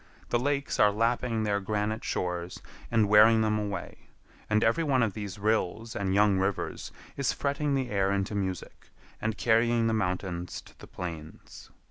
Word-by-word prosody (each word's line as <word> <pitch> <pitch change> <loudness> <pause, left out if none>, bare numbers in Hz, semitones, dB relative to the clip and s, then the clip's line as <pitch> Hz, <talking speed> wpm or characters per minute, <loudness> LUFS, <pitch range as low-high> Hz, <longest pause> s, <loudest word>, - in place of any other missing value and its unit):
The 120 - +2
lakes 140 +2 -1
are 105 - +6
lapping 115 +1 0
their 100 -1 +1
granite 105 +2 -2
shores 90 0 -3 0.3
and 110 -3 +3
wearing 110 +2 +6
them 105 -1 +1
away, 100 -3 -6 0.4
and 110 +1 +3
every 115 +9 +2
one 135 -5 +2
of 110 -4 0
these 100 -2 -6
rills 110 +1 -1
and 95 -1 -1
young 100 -2 +4
rivers 95 +1 -2 0.3
is 140 -2 +1
fretting 140 0 -1
the 130 -2 -2
air 100 -1 +1
into 100 +1 -1
music, 95 -3 -4 0.3
and 110 0 -2
carrying 115 0 +3
the 115 - +1
mountains 90 -3 -2
to - - -19
the - - -12
plains. 80 -3 -8
105 Hz, 165 wpm, -28 LUFS, 95-115 Hz, 0.4 s, are